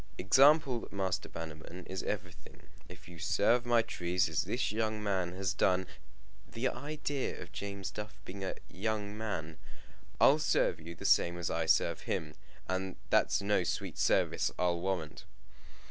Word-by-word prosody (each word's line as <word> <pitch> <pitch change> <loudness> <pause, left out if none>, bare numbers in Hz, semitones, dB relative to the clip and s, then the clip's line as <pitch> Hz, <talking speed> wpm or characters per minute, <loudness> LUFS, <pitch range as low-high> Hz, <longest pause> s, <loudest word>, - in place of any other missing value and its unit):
"Example, 135 - +5
Master 95 -2 -2
Bannerman, 80 +2 -8
is 95 0 -4
everything. - - -6 0.3
If - - -12
you 85 -1 -11
serve 115 +9 +2
my 120 -1 +4
trees 90 -1 0
as - - 0
this 120 -2 -1
young 110 -1 -1
man 95 -4 0
has 95 0 -1
done 95 -1 +2 0.3
" 75 0 -27
The 125 +3 +1
idea 145 -1 -3
of 85 - -9
James 100 +3 -5
Duff 105 0 -7
being 95 +1 -7
a 95 - -2
young 105 +1 -3
man! 80 -8 -4 0.3
" - - -25
I'll 145 +3 +6
serve 90 - +2
you 85 +1 -8
the - - -9
same 85 0 +4
as 85 -1 -2
I 80 -1 -1
serve 80 - +3
him 75 -1 -2 0.3
and 95 0 -2 0.2
that's - - +3
no 100 -2 +2
sweet - - -3
service, - - +2
I'll 90 -1 +1
warrant." 90 -5 -3
95 Hz, 160 wpm, -32 LUFS, 85-110 Hz, 0.3 s, I'll